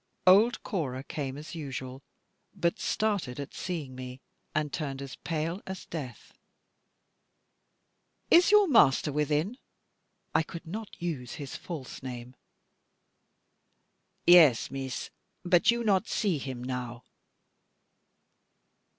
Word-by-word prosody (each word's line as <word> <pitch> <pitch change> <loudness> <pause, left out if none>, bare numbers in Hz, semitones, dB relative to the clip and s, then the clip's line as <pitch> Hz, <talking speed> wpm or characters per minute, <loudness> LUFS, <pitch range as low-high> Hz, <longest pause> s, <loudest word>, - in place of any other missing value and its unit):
Old 210 +6 +6
Cora 135 - -3
came 140 -2 -4
as 150 +1 -9
usual; 135 -4 -6 0.5
but 170 -3 0
started 200 - -1
at 140 +1 -6
seeing 160 -8 -4
me, 130 0 -8 0.4
and 150 -2 0
turned 140 -5 -3
as 135 -2 -7
pale 165 +3 -3
as 190 -1 -6
death. 140 -7 -7 2.0
"Is 345 +1 +7
your 420 -1 +6
master 150 - +5
within?" 150 - 0 0.7
I - - +4
could 165 +1 -8
not 210 +5 -7
use 150 -8 -4
his 140 -3 -7
false 155 -7 -7
name. 125 -1 -7 1.9
"Yes, 160 -9 +7
Meesa, 135 -2 -4 0.3
but 175 +2 +4
you 235 0 +3
not 205 -1 +2
see 190 -8 0
him 130 -2 -6
now." 125 -1 -5
150 Hz, 110 wpm, -29 LUFS, 130-185 Hz, 2.0 s, Is